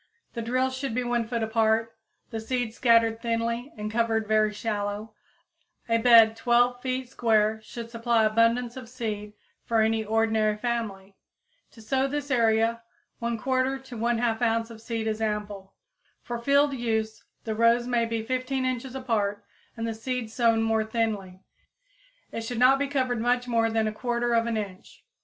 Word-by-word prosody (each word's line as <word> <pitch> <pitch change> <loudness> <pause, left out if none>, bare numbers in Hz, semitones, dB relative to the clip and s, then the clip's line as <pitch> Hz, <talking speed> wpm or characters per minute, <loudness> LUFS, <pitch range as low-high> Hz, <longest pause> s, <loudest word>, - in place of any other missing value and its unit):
The 235 - -4
drills 255 +3 0
should 260 -3 -3
be 250 - 0
1 240 -2 -1
foot 230 -1 -2
apart, 220 0 +1 0.4
the 225 - -3
seeds 235 0 -2
scattered 230 -2 +3
thinly 235 +2 -2
and 210 0 -4
covered 225 -1 +1
very 215 0 +3
shallow; 210 0 -3 0.7
a 230 0 +2
bed 225 -2 +7
12 245 +1 +2
feet 255 0 -2
square 220 -3 +2
should 230 +1 -8
supply 230 -1 +1
abundance 230 +2 +2
of 255 -3 -9
seed 215 -4 -5 0.3
for 230 -2 +1
any 220 0 +1
ordinary 220 -1 +1
family. 210 -5 -4 0.6
To 225 - -14
sow 265 +4 +1
this 285 0 -4
area 230 -1 +2 0.4
1/4 255 +3 0
to 260 -2 -10
1/2 235 0 0
ounce 230 0 +1
of 225 -1 -11
seed 230 -1 -3
is 220 0 -2
ample. 205 -3 -4 0.5
For 240 -1 -4
field 280 +3 +3
use 220 -3 -2 0.2
the 220 - -3
rows 230 +2 +3
may 240 -2 +1
be 230 -1 -3
15 255 +2 -2
inches 255 0 -3
apart 215 -6 -1 0.3
and 230 0 -2
the 225 - -2
seed 230 0 -4
sown 230 -1 +2
more 225 -1 +1
thinly. 210 -5 -3 0.9
It 230 - -4
should 225 +1 -5
not 255 +3 +5
be 285 - 0
covered 255 -4 -1
much 245 +1 +1
more 230 -1 +2
than 225 0 +1
1/4 235 +1 0
inch. 195 -3 -8
230 Hz, 160 wpm, -26 LUFS, 220-245 Hz, 0.9 s, bed